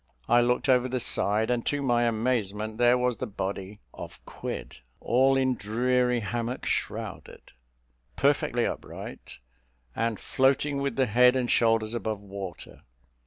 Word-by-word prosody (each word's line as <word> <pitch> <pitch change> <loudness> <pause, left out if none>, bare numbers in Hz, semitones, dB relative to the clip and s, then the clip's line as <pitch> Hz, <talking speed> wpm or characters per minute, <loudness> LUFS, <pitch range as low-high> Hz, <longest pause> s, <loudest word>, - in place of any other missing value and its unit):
I 120 0 +5
looked 125 +3 +1
over 130 -1 +3
the 130 0 -1
side, 110 -1 +1
and, 120 -1 0
to 145 - 0
my 120 -2 +2
amazement 110 -2 -1
there 120 +1 +5
was 125 -1 0
the 130 - -4
body 100 0 -5
of - - -9
Quid, - - -6 0.2
"All 135 +2 +3
in 130 -1 +2
dreary 125 +2 0
hammock 120 +3 -3
shrouded," - - -4 0.6
perfectly - - +1
upright, - - -7 0.6
and 115 -2 -1
floating 140 +2 +1
with 140 -4 -2
the 130 - +2
head 125 +3 +5
and 125 -2 0
shoulders 115 -1 +2
above 110 -3 -3
water. 100 -3 -9
120 Hz, 140 wpm, -27 LUFS, 110-125 Hz, 0.6 s, I